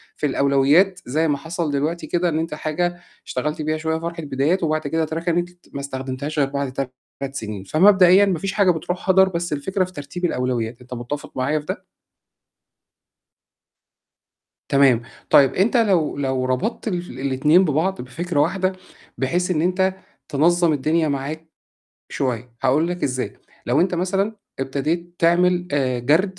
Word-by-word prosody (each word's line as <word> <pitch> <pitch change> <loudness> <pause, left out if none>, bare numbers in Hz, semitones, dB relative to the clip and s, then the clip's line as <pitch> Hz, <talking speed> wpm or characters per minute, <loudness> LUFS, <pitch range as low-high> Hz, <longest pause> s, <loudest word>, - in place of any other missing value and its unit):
في - - -2
الأولويات 140 +7 +3
زي 155 +6 +1
ما 145 -1 +1
حصل 160 0 -3
دلوقتي 155 +5 -2
كده 175 0 +1
إن 160 -1 -1
أنت 165 -1 -3
حاجة 175 +3 -2 0.3
اشتغلت 150 +4 -3
بيها 155 +1 -1
شوية 160 0 -1
فرحة 170 0 -5
بدايات 145 +6 0
وبعد 155 -2 0
كده 160 +2 0
أتركنت 170 +2 -1 0.2
ما 140 - -4
استخدمتهاش 135 +2 -4
غير 140 -1 +2
بعد 140 -2 -3
3 135 +1 -6
سِنين، 105 -6 -5
فمبدئيًا 185 - +6
ما 185 -5 0
فيش 195 +3 -3
حاجة 200 -3 +4
بتروح 180 +3 -4
هَدَر، 190 0 +6
بس 170 -3 -3
الفكرة 185 +7 -1
في 185 - -7
ترتيب 175 +3 -5
الأولويات، 125 -5 -2
أنت 125 0 -10
مُتفق 125 +4 -5
معايا 140 +4 +1
في 150 - -12
ده؟ - - -5 2.9
تمام، 135 -4 +4 0.3
طيب 135 -1 +6
أنت 205 +7 +2
لو 190 -12 +2
لو 130 -2 -1
ربطت 130 - -1
الف 175 -2 -3
الاتنين 140 +7 +3
ببعض 170 +5 0
بفكرة 150 +5 -2
واحدة 185 +4 +1 0.5
بحيث 175 +7 0
إن 155 -3 +1
أنت 185 +2 +1 0.3
تنظّم 170 +3 +3
الدنيا 155 +3 +1
معاك 145 +4 -4 0.6
شوية، 125 -2 -3
هاقول 155 +6 +3
لك 175 0 -4
إزاي، 130 -1 -1 0.3
لو 130 +6 +3
أنت 180 0 +2
مثلًا 195 +4 -1 0.2
ابتديت 155 +6 -2
تعمل 175 +1 +3
آآ 130 -3 +1
جَرد 160 +10 +1
155 Hz, 155 wpm, -22 LUFS, 135-175 Hz, 2.9 s, فمبدئيًا